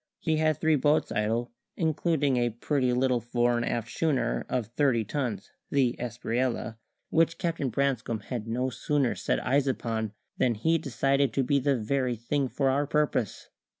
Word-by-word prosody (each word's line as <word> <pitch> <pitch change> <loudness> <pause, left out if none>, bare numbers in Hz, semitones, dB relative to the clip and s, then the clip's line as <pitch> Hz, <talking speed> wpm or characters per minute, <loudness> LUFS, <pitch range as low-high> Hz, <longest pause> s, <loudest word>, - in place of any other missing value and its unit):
He 160 -1 0
had 155 -2 +2
three 155 -1 +3
boats 150 +3 +2
idle, 115 +3 0 0.3
including 155 -3 +1
a 120 -1 +2
pretty 125 +3 0
little 125 0 +2
fore 120 +1 +1
and 120 - 0
aft 115 0 -2
schooner 135 -7 0
of 125 -3 0
thirty 120 -1 +1
tons, 115 -5 -3 0.2
the 130 -4 +2
Espriella, 120 -1 -2 0.3
which 165 0 +3
Captain 165 -6 -1
Branscome 125 -3 -1
had 115 0 -5
no 125 +3 -1
sooner 140 0 0
set - - -1
eyes 140 +2 +2
upon 110 -4 -2 0.3
than 120 -2 +2
he 160 +10 +2
decided 135 +1 +1
to 135 - +1
be 140 +3 +2
the 140 0 +1
very 125 +2 0
thing 135 +5 -1
for 135 0 +1
our 140 +2 +1
purpose. 145 -8 -1
130 Hz, 165 wpm, -28 LUFS, 120-145 Hz, 0.3 s, three